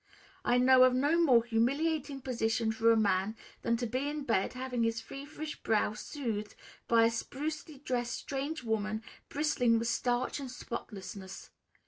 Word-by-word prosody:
I 245 Hz, -, +3 dB
know 255 Hz, +1 st, +7 dB
of 255 Hz, -1 st, +5 dB
no 295 Hz, +6 st, +3 dB
more 250 Hz, -8 st, +5 dB
humiliating 275 Hz, +5 st, 0 dB
position 230 Hz, -3 st, 0 dB
for 225 Hz, +1 st, +3 dB
a 225 Hz, -, +4 dB
man 200 Hz, 0 st, +1 dB, 0.3 s
than 235 Hz, 0 st, +1 dB
to 245 Hz, -, -2 dB
be 255 Hz, +5 st, -1 dB
in 295 Hz, 0 st, -4 dB
bed 225 Hz, -6 st, +1 dB
having 255 Hz, -1 st, -3 dB
his 230 Hz, 0 st, +1 dB
feverish 295 Hz, +5 st, -7 dB
brow 215 Hz, -1 st, +1 dB
soothed 215 Hz, -5 st, -4 dB, 0.3 s
by 230 Hz, -1 st, +5 dB
a 230 Hz, -, +3 dB
sprucely 290 Hz, +4 st, -5 dB
dressed 245 Hz, -3 st, -1 dB
strange 280 Hz, +2 st, -4 dB
woman, 220 Hz, -1 st, -1 dB, 0.3 s
bristling 265 Hz, -6 st, +2 dB
with 230 Hz, +1 st, -1 dB
starch 245 Hz, +3 st, 0 dB
and 270 Hz, -2 st, -6 dB
spotlessness. 200 Hz, -5 st, -7 dB
245 Hz, 155 wpm, -32 LUFS, 225-275 Hz, 0.3 s, know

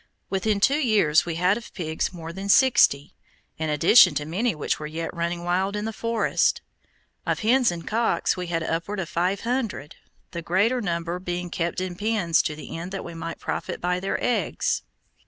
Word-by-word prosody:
Within 200 Hz, +2 st, 0 dB
two 275 Hz, +8 st, +3 dB
years 205 Hz, -, +3 dB
we 165 Hz, -, -2 dB
had 180 Hz, +4 st, +2 dB
of 235 Hz, -, -10 dB
pigs 160 Hz, -3 st, -2 dB
more 165 Hz, -2 st, -8 dB
than 195 Hz, +2 st, -6 dB
sixty, 200 Hz, -, +4 dB, 0.5 s
in 160 Hz, -1 st, -1 dB
addition 170 Hz, +3 st, +6 dB
to 145 Hz, -, -1 dB
many 190 Hz, +7 st, -1 dB
which 150 Hz, -, -2 dB
were 150 Hz, -, -5 dB
yet 165 Hz, +2 st, -5 dB
running 170 Hz, 0 st, -3 dB
wild 185 Hz, +3 st, 0 dB
in 210 Hz, 0 st, -3 dB
the 225 Hz, -, -3 dB
forest. 230 Hz, +1 st, +1 dB, 0.6 s
Of -, -, -1 dB
hens 245 Hz, +3 st, +4 dB
and 170 Hz, -1 st, -7 dB
cocks 230 Hz, +2 st, +1 dB
we 180 Hz, -1 st, -5 dB
had 165 Hz, -1 st, -1 dB
upward 170 Hz, +6 st, -2 dB
of 175 Hz, -, -4 dB
five 180 Hz, +3 st, 0 dB
hundred, 230 Hz, -, -3 dB, 0.3 s
the 170 Hz, -, -5 dB
greater 205 Hz, +9 st, +1 dB
number 170 Hz, -2 st, -2 dB
being 175 Hz, -1 st, -4 dB
kept 170 Hz, -1 st, -2 dB
in 185 Hz, -1 st, -3 dB
pens 205 Hz, -5 st, +1 dB
to 150 Hz, -, -2 dB
the 155 Hz, -, -8 dB
end 170 Hz, +3 st, -6 dB
that 195 Hz, -, -5 dB
we 170 Hz, -, -7 dB
might 165 Hz, 0 st, -6 dB
profit -, -, -4 dB
by 180 Hz, +1 st, 0 dB
their 195 Hz, +1 st, -2 dB
eggs. 245 Hz, -, 0 dB
180 Hz, 190 wpm, -25 LUFS, 165-210 Hz, 0.6 s, addition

